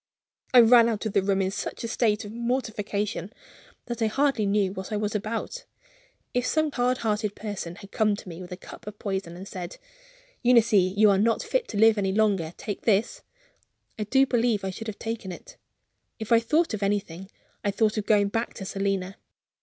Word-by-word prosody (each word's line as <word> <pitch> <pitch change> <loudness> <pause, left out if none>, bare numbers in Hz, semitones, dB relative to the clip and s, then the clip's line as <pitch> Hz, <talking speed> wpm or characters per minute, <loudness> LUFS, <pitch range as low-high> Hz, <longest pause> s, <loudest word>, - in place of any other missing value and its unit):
I 250 - +9
ran 235 0 +7
out 220 -1 -3
of 215 - -2
the - - +3
room 195 0 +1
in 190 - -1
such 195 - -5
a - - -2
state 225 -2 +1
of 205 - -8
mortification 215 -5 -2 0.5
that 240 -1 -5
I 225 - +3
hardly 270 -2 +1
knew 200 -2 +1
what 190 +2 -7
I 210 - 0
was 210 0 -2
about. 220 - -3 0.7
If 245 - +1
some 310 -1 +1
hard 250 -1 +1
hearted 210 -1 0
person 200 -5 -5
had 200 - -13
come 215 -2 +2
to 200 - -11
me 170 0 -8
with 180 - -10
a 180 - -5
cup 195 - -12
of 210 0 -7
poison, 190 -4 -3
and 180 +2 -9
had - - -11
said: 180 -2 -7 0.6
"Eunice, 235 -3 +4
you 200 +2 +5
are 195 - +3
not 225 +2 +2
fit - - -1
to 210 - -5
live 220 0 +5
any 190 -1 0
longer; 200 -6 +1
take 205 -3 -5
this," 220 +1 +1 0.8
I 210 - -1
do 265 +6 +4
believe 235 -5 +1
I 190 - -2
should 225 +4 -8
have 215 - -5
taken 225 -4 -5
it. - - -11 0.6
If 220 0 -7
I 230 - +7
thought 305 +6 +1
of 210 - -3
anything, 195 -2 -2 0.3
I 205 - +1
thought 215 +2 +1
of 215 -2 -3
going 205 -2 +4
back 225 +3 -2
to 195 - -7
Selina. 195 0 -2
210 Hz, 210 wpm, -26 LUFS, 195-230 Hz, 0.8 s, I